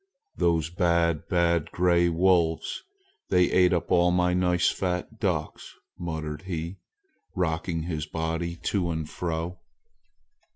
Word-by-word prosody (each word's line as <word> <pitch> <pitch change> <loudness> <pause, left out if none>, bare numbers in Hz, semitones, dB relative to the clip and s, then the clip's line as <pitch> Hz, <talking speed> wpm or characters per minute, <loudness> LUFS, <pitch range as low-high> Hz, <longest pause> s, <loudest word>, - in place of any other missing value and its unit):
"Those, 85 -1 +1
bad, 85 -2 +1
bad 85 -3 +1
gray 85 -1 +3
wolves! 85 -1 +1 0.5
They 90 -1 +3
ate 90 0 +4
up 85 -2 -1
all 90 0 +5
my 90 0 +2
nice 90 -1 +2
fat 90 +4 -3
ducks!" 85 -7 -3 0.2
muttered 80 -3 -4
he, 85 -1 -5 0.6
rocking 80 -1 -1
his 80 -2 -3
body 80 +2 -3
to 95 -4 0
and 80 -2 -3
fro. 85 +2 -4
85 Hz, 120 wpm, -26 LUFS, 80-90 Hz, 0.6 s, all